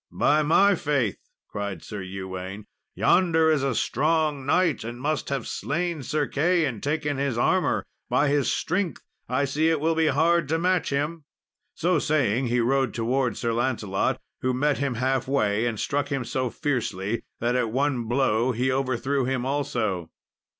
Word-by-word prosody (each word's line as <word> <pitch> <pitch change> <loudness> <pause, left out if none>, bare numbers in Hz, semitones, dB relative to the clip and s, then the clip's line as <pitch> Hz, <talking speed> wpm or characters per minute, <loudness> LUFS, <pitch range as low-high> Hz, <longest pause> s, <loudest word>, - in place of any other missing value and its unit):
"By 150 +1 +3
my 195 +7 +5
faith," 140 - 0 0.3
cried 100 -2 -5
Sir 105 -2 -6
Ewaine, 95 +1 -6 0.3
"yonder 165 -3 +3
is 150 -3 +2
a 135 -3 0
strong 150 +1 0
knight, 175 0 +2
and 120 +1 -6
must 150 +3 -1
have 140 -4 -2
slain 170 -1 -2
Sir 150 +3 -1
Key, 165 +4 +2
and 115 -7 -4
taken 150 -1 -1
his 135 -3 -1
armour! 120 - +1 0.2
By 145 - +3
his 145 -1 +2
strength, 185 0 -1 0.3
I 130 +3 +1
see 150 +4 +1
it 160 -2 +1
will 160 +2 +1
be 160 0 +2
hard 170 0 +3
to 160 - +2
match 180 0 +1
him." 150 +3 -2 0.5
So 175 -1 +2
saying 130 -5 +1
he 120 +1 +1
rode 130 -1 +1
towards 120 +1 0
Sir 115 -1 -1
Lancelot, 115 -5 0 0.2
who 130 0 0
met 145 +2 +1
him 140 -3 -1
halfway 130 -3 +1
and 110 -3 -3
struck 145 -1 -1
him 135 -3 -1
so 130 +1 -1
fiercely, 115 -7 -2 0.2
that 120 +1 0
at 125 -3 +1
one 130 -1 0
blow 120 0 +1
he 125 +3 0
overthrew 130 +1 0
him 130 -1 -1
also. 120 - -1
135 Hz, 165 wpm, -25 LUFS, 120-150 Hz, 0.5 s, my